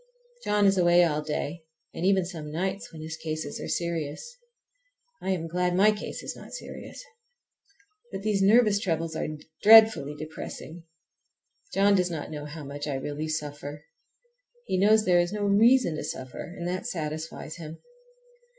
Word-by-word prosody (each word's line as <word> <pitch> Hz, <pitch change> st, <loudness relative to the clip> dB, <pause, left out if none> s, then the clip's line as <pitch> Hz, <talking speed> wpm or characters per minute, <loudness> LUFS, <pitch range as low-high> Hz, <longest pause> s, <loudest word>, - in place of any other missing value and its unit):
John 210 Hz, 0 st, +2 dB
is 195 Hz, -1 st, +4 dB
away 175 Hz, 0 st, +5 dB
all 150 Hz, -3 st, +1 dB
day, 155 Hz, +2 st, -4 dB, 0.3 s
and -, -, -5 dB
even 190 Hz, -2 st, +3 dB
some 160 Hz, -4 st, -7 dB
nights 190 Hz, +8 st, -3 dB
when 155 Hz, -1 st, -9 dB
his 160 Hz, +1 st, -5 dB
cases 155 Hz, -2 st, -5 dB
are -, -, -5 dB
serious. 170 Hz, -, -3 dB, 0.9 s
I -, -, -3 dB
am 175 Hz, -3 st, -1 dB
glad 180 Hz, +1 st, 0 dB
my 205 Hz, +3 st, +6 dB
case 210 Hz, 0 st, -6 dB
is -, -, -5 dB
not -, -, -12 dB
serious! -, -, -8 dB, 1.1 s
But 195 Hz, -, -6 dB
these 210 Hz, -2 st, +1 dB
nervous 210 Hz, 0 st, +5 dB
troubles 165 Hz, -5 st, -2 dB
are -, -, -2 dB, 0.3 s
dreadfully 220 Hz, -9 st, +7 dB
depressing. 155 Hz, +1 st, -8 dB, 0.9 s
John 200 Hz, +1 st, +4 dB
does 180 Hz, -2 st, +2 dB
not 155 Hz, -3 st, -5 dB
know 150 Hz, -1 st, -6 dB
how 150 Hz, +1 st, -8 dB
much 145 Hz, +1 st, -6 dB
I 145 Hz, -, -2 dB
really 145 Hz, +3 st, -4 dB
suffer. 150 Hz, -1 st, -5 dB, 0.8 s
He 185 Hz, -, 0 dB
knows 215 Hz, +2 st, +5 dB
there 180 Hz, -1 st, +4 dB
is 175 Hz, +1 st, +1 dB
no 210 Hz, -1 st, -2 dB
reason 205 Hz, -2 st, +4 dB
to -, -, -4 dB
suffer, 130 Hz, -1 st, -6 dB
and 175 Hz, -, -4 dB
that 185 Hz, +6 st, -3 dB
satisfies 160 Hz, -3 st, -5 dB
him. 160 Hz, -1 st, -8 dB
170 Hz, 160 wpm, -27 LUFS, 155-200 Hz, 1.1 s, dreadfully